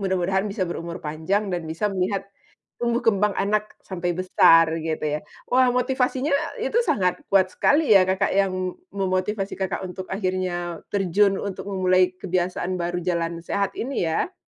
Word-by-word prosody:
mudah-mudahan 190 +1 0
bisa 195 -1 -2
berumur 170 0 -5
panjang 160 +7 0
dan 175 -1 -2
bisa 165 +6 -3
melihat, 195 +1 -1 0.6
tumbuh 235 0 +1
kembang 210 -1 +3
anak 210 +1 +1 0.3
sampai 175 -2 -2
besar 165 -2 +6 0.2
gitu 160 -1 -2
ya. - - -1 0.3
Wah 255 +1 +5
motivasinya 255 +2 0 0.3
itu - - -3
sangat 185 - +2 0.2
kuat 195 -1 +5
sekali 295 +3 +3
ya, 195 - +8
Kakak, 190 +2 +1
yang 195 -1 +2 0.5
memotivasi 195 +1 -1
Kakak 190 -1 -3
untuk 185 +1 -7
akhirnya 185 -3 -2
terjun 195 0 +2
untuk 200 -2 -5
memulai 185 -1 +3 0.2
kebiasaan 185 -1 -2
baru 175 +1 -2
jalan 170 -1 -1
sehat 200 -1 0
ini 265 +4 -3 0.2
ya? 360 - -1
190 Hz, 150 wpm, -24 LUFS, 180-205 Hz, 0.6 s, ya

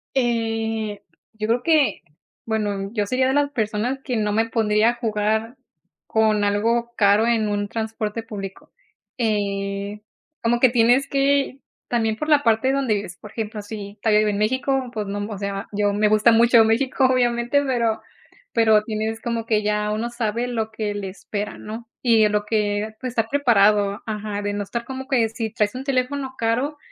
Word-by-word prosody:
Eh, 225 -4 -1 0.3
yo 215 0 -3
creo 235 +2 +1
que, 310 -2 +3 0.4
bueno, 205 -3 -2
yo 210 -3 -1
sería 255 +3 +1
de - - +2
las 290 0 +2
personas 225 +3 -1
que 250 -3 -2
no 210 -1 0
me 225 +2 +1
pondría 215 0 +3
a - - -4
jugar 220 +1 -1 0.5
con 215 -1 +2
algo 230 +4 +1
caro, 205 +2 +4
en 225 -2 +2
un 205 0 -1
transporte 220 0 -3
público, 195 -3 -8 0.5
eh, 200 -2 -2 0.4
como 235 +1 +2
que 255 - +6
tienes 245 +3 +3
que, 275 -1 +1 0.3
también 225 -2 0
por 305 +6 -4
la 300 -2 +5
parte 230 +2 +2
donde 270 -5 +1
vives, 200 -3 -5
por 210 - -11
ejemplo, 220 -1 -5
si 205 0 -8
todavía 215 -2 +4
vive 215 0 +2
en 200 - -2
México, 260 +4 0
pues, 210 -3 -3
no, 205 +1 -4
o 205 - -5
sea, 200 0 -4
yo 205 0 +1
me 210 +1 +2
gusta 215 +2 +5
mucho 230 0 +6
México, 255 +4 +2
obviamente, 245 +1 +2
pero 235 -4 0 0.5
pero 220 -2 +4
tienes 220 0 -3
como 230 -1 -2
que 215 -2 +1
ya 210 0 0
uno 225 +3 -2
sabe 235 0 -2
lo 220 -2 -2
que 215 -2 -3
le 200 -1 -4
espera, 205 +2 -5
¿no? 220 +2 -8
Y 225 -3 +5
lo 210 0 0
que, 210 0 -1
pues, 255 -1 -3
estar 225 -2 0
preparado 210 -7 +3
ajá, 210 -1 -4
de 205 0 -2
no 205 0 -2
estar 235 +4 -4
como 265 +1 -6
que 240 -5 +2
si 225 0 -4
traes 210 +1 0
un 260 - -5
teléfono 265 0 -1
caro, 245 +6 0
220 Hz, 180 wpm, -22 LUFS, 210-240 Hz, 0.5 s, que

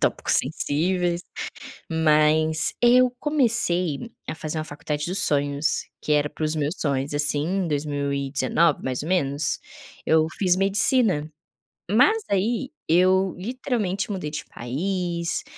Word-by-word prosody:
tópicos - - +1
sensíveis, 170 +5 0 0.7
mas 155 0 +2
eu 245 +1 +5
comecei 200 - 0 0.2
a - - -4
fazer 155 0 -5
uma - - -2
faculdade 150 0 -4
dos 185 +3 +2
sonhos 145 +1 +1 0.2
que - - -3
era 150 0 +2
para 155 - -6
os 155 +1 -1
meus 150 +2 -1
sonhos, 140 -1 -1
assim, 145 0 0
em 190 0 -1
2019 145 0 0
mais 130 +1 -2
ou 160 - -6
menos, 145 -5 0 0.5
eu 160 0 +3
fiz 180 -3 +3
medicina. 195 - +2 0.6
Mas 430 - +4
aí 225 +7 0 0.2
eu 185 +3 +3
literalmente 215 -2 -2
mudei 180 -7 -4
de 150 - -5
país, 170 +6 -3
160 Hz, 125 wpm, -24 LUFS, 150-190 Hz, 0.7 s, eu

